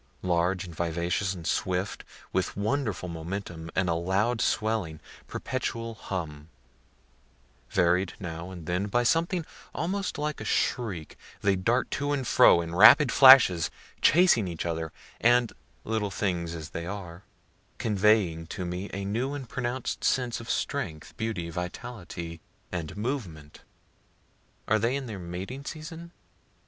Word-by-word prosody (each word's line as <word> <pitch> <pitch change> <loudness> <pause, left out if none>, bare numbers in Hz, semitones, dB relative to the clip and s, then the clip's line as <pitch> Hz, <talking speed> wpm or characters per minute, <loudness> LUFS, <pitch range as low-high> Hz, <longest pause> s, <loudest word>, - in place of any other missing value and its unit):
Large 90 +1 +1
and 85 - -9
vivacious 85 +4 -1
and 85 -2 -9
swift, 90 +5 -1 0.3
with 95 0 -1
wonderful 110 -3 -1
momentum 85 0 -6
and 95 0 +2
a 85 - +2
loud 95 +8 0
swelling, 105 -8 0 0.3
perpetual 115 -3 -3
hum, 80 -8 -6 1.2
varied 90 +1 +2
now 85 -1 -6
and 90 -4 -9
then 90 +4 -1
by 120 +4 +1
something 165 +5 +1 0.3
almost 195 +2 -2
like 150 +1 -3
a - - -4
shriek, 100 - -1 0.2
they 100 -1 +3
dart 115 +7 +1
to 145 +1 -1
and 135 -3 -1
fro, 85 - +6
in 85 0 -6
rapid 115 - +8
flashes, 130 - +8 0.3
chasing 155 - +5
each 85 -2 -4
other, 80 -1 -2 0.3
and 120 0 +4 0.3
(little 110 -2 -1
things 85 -4 -2
as 80 -1 -7
they 85 +1 -5
are,) 90 -3 -7 0.6
conveying 100 -6 +2
to 90 - -5
me 90 +3 -4
a 100 0 -4
new 120 +8 -1
and 135 -4 -7
pronounc'd 125 0 -3
sense 125 -2 +1
of 115 - -9
strength, 75 -2 -3
beauty, 95 -6 -3
vitality 90 -2 -6 0.3
and 85 +1 -5
movement. 100 - -4 1.1
Are 110 - +3
they 115 +5 +1
in 140 -1 -3
their 110 -5 -6
mating 95 +10 -6
season? 165 +2 -7
95 Hz, 135 wpm, -28 LUFS, 85-120 Hz, 1.2 s, rapid